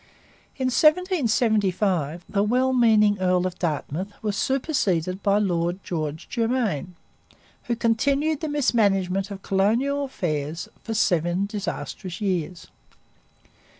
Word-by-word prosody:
In 260 -1 0
1775 215 - +2
the 200 - 0
well 250 +5 +2
meaning 215 -4 +4
Earl 180 -1 +2
of 185 -1 -4
Dartmouth 170 +3 -2
was 210 -2 -1
superseded 195 - 0
by 200 0 +3
Lord 175 -3 0
George 155 -3 -4
Germain, 225 - -1 0.7
who 240 - -1
continued 275 +7 +1
the 315 - -3
mismanagement 200 -9 +1
of 195 -1 -8
colonial 235 +9 +1
affairs 160 - -3
for 225 - -4
seven 175 -2 +1
disastrous 200 -2 -5
years. 180 -4 -2
200 Hz, 110 wpm, -24 LUFS, 180-240 Hz, 0.7 s, meaning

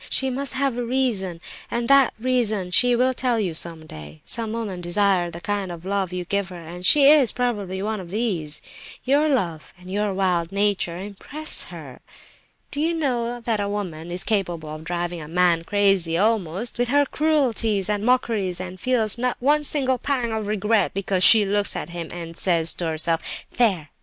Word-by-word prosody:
She 265 0 +3
must 275 +2 -2
have 270 -2 0
a - - -1
reason, 230 -9 -1 0.3
and 235 0 -2
that 275 -3 +5
reason 220 -7 0
she 245 +6 +4
will 255 +2 +2
tell 245 -2 0
you 185 -6 -1
some 165 0 -1
day. 75 - -11
Some 225 -2 0
women 215 -6 -4
desire 180 0 +2
the 170 0 -8
kind 200 -1 -3
of 170 0 -9
love 195 -2 -1
you 180 -1 -4
give 200 +1 -1
her, 180 -2 -9
and 175 +2 -9
she 285 +9 +5
is 285 -6 +6
probably 205 -6 -2
one 215 0 -2
of 180 -2 -9
these. 180 -8 -2 0.4
Your 290 +4 +2
love 175 - -2
and 180 +1 -12
your 205 +1 0
wild 180 -3 0
nature 200 -4 0
impress 205 +11 -2
her. - - -10 0.7
Do 285 - -2
you 335 +2 +1
know 245 -6 -2
that 230 -2 -1
a 200 0 -1
woman 175 -6 -5
is 175 +1 -3
capable 175 -7 -2
of 155 +1 -9
driving 175 0 -3
a 150 - -8
man 170 0 +2
crazy 195 -5 +2
almost, 210 +1 0
with 245 - +2
her 285 +3 +3
cruelties 250 - +1
and 210 -1 -1
mockeries, 220 -7 +1
and 185 0 -7
feels 235 -3 0
not 250 0 -1
one 295 +4 +2
single 260 -4 +1
pang 250 -5 -1
of 220 -2 -3
regret, 210 +1 +1
because 195 -1 0
she 215 0 +9
looks 205 +1 0
at 150 - -5
him 170 -1 -5
and 165 -1 -8
says 170 -2 0
to 170 - -3
herself, 160 +1 -1 0.3
'There! 185 - +1
205 Hz, 190 wpm, -23 LUFS, 175-240 Hz, 0.7 s, she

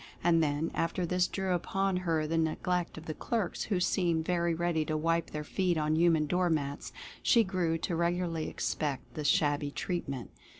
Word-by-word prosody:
And 165 -1 +4
then, 150 +1 0
after 170 +2 -1
this 180 +1 +2
drew 190 -2 -1
upon 195 +2 0
her 165 -4 0
the 160 +2 -1
neglect 165 +2 0
of 160 - -9
the 155 - -3
clerks, 215 +1 -2
who 195 -4 0
seem 175 -3 +1
very 170 0 +1
ready 170 -1 +1
to 155 0 -1
wipe 165 +1 +1
their 150 0 -4
feet 180 +2 0
on 155 0 +1
human 165 -2 +4
door 180 +3 +1
mats, 145 -3 -2 0.3
she 235 -2 +5
grew 180 -4 0
to 165 +1 -2
regularly 170 -1 0
expect 145 -4 -3
the 150 - -4
shabby 145 0 +2
treatment. 140 -6 -4
165 Hz, 180 wpm, -31 LUFS, 155-180 Hz, 0.3 s, she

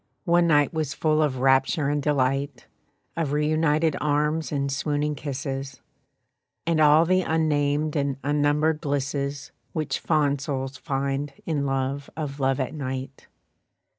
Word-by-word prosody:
One 170 0 +4
night 145 -1 +3
was 155 -3 -2
full 155 -1 +2
of 135 -4 0
rapture 135 +3 +3
and 145 +1 0
delight 135 -2 0 0.5
Of 155 -4 -1
reunited 155 +1 +2
arms 150 +2 0
and 140 -2 -1
swooning 145 +2 -1
kisses, 135 -2 -5 0.9
And 165 -2 +2
all 155 +2 +6
the 185 +2 +3
unnamed 155 -2 0
and 140 -2 0
unnumbered 150 +2 +1
blisses 140 -1 -2 0.2
Which 155 -4 -2
fond 145 -3 +1
souls 135 -2 -3
find 135 +1 -2
in 145 -4 -1
love 135 +1 -2
of 145 -3 -4
love 135 0 +1
at 130 +1 -2
night. 135 -2 -6
145 Hz, 135 wpm, -25 LUFS, 135-155 Hz, 0.9 s, all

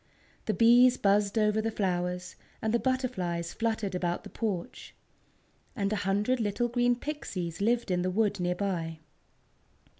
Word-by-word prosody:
The 215 - 0
bees 240 +4 +6
buzzed 200 +1 +2
over 215 0 +3
the 225 - -1
flowers, 180 -3 -2 0.2
and 220 0 -1
the 235 - +3
butterflies 205 -11 -1
fluttered 220 -3 -1
about 175 -1 -1
the - - -11
porch. 200 -7 -4 0.8
And 200 -2 0
a 205 -2 -2
hundred 210 +6 +1
little 225 +2 0
green 245 0 +2
Pixies 205 - -5
lived 230 0 +1
in 180 0 +1
the 185 - 0
wood 205 +1 +1
near 180 0 0
by. 170 -5 -2
205 Hz, 150 wpm, -29 LUFS, 180-235 Hz, 0.8 s, bees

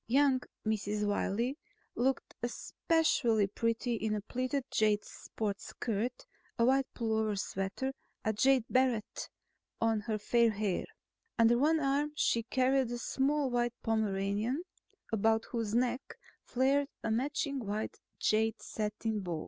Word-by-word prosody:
Young 265 +1 +4 0.2
Mrs. 210 -1 0
Wiley 230 - 0 0.3
looked 265 +2 0
especially 240 -3 +1
pretty 230 +4 -1
in 215 0 -1
a 210 - -2
pleated 255 +5 -2
jade 210 -1 +2
sports 205 -2 -5
skirt, 235 +2 -3 0.3
a 230 - +4
white 265 +1 +3
pullover 220 -3 0
sweater, 195 +8 -2 0.3
a 220 - +2
jade 260 +2 +4
beret 255 -4 0 0.5
on 225 -1 +2
her 215 +1 -2
fair 235 +2 +3
hair. 205 -3 -1 0.5
Under 230 +1 +5
one 315 +4 +4
arm 290 +1 +1
she 235 -5 +2
carried 260 +2 +2
a 240 - -3
small 275 +2 0
white 240 -1 0
Pomeranian 215 - 0 0.5
about 220 +1 +3
whose 225 -3 -1
neck 250 +2 0 0.3
flared 275 +3 +2 0.2
a 225 - 0
matching 280 +3 0
wide 215 -2 -3 0.2
jade 220 +1 +1
satin 215 0 -2
bow. 175 -5 -3
230 Hz, 130 wpm, -32 LUFS, 215-260 Hz, 0.5 s, Under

